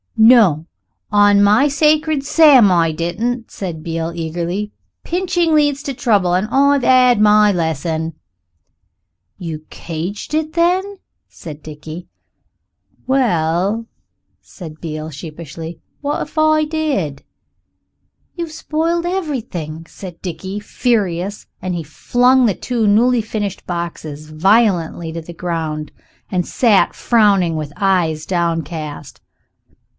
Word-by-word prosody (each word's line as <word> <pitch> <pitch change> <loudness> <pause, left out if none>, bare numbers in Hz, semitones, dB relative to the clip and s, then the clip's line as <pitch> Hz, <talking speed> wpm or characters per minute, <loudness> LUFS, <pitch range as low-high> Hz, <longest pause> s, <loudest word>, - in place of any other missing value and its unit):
"No 220 -9 +5 0.5
on 205 -1 +5
my 215 +8 +5
sacred 305 0 +2
sam, 285 - +6
I 165 -2 +3
didn't," 220 +9 -3
said 170 -5 -6
Beale 165 0 -3
eagerly; 175 +5 -3 0.3
"pinching 350 -2 0
leads 290 -2 +2
to 275 - -3
trouble. 205 -7 +2
I've 270 +9 +2
'ad 250 -2 +5
my 210 0 +5
lesson." 160 -1 -2 1.2
"You 160 -3 -6
cadged 175 - -6
it, 315 0 -1
then?" 370 +4 +1 0.3
said 155 -2 -10
Dickie. 155 +3 -9 1.0
"Well," 205 -3 +1 0.5
said 155 -5 -11
Beale 155 -1 -5
sheepishly, 160 +2 -8 0.2
"what 290 0 -2
if 305 - -8
I 310 0 +3
did?" 285 - -2 1.1
"You've 335 -2 -5
spoiled 330 +2 -1
everything," 225 - -4
said 180 -4 -10
Dickie, 190 +3 -5
furious, 205 -4 -1 0.2
and 185 -1 -3
he 170 - -4
flung 245 - +2
the 215 - +2
two 235 -4 -1
newly 235 +4 +4
finished 210 -3 -4
boxes 160 -3 -5
violently 175 -1 +2
to 165 - -5
the 170 +2 -10
ground, 160 -3 -4 0.4
and 180 -2 0
sat 220 -6 +3
frowning 200 -7 +3
with 150 -2 -5
eyes 170 -6 +1
downcast. 165 -4 -3
195 Hz, 110 wpm, -18 LUFS, 165-255 Hz, 1.2 s, sam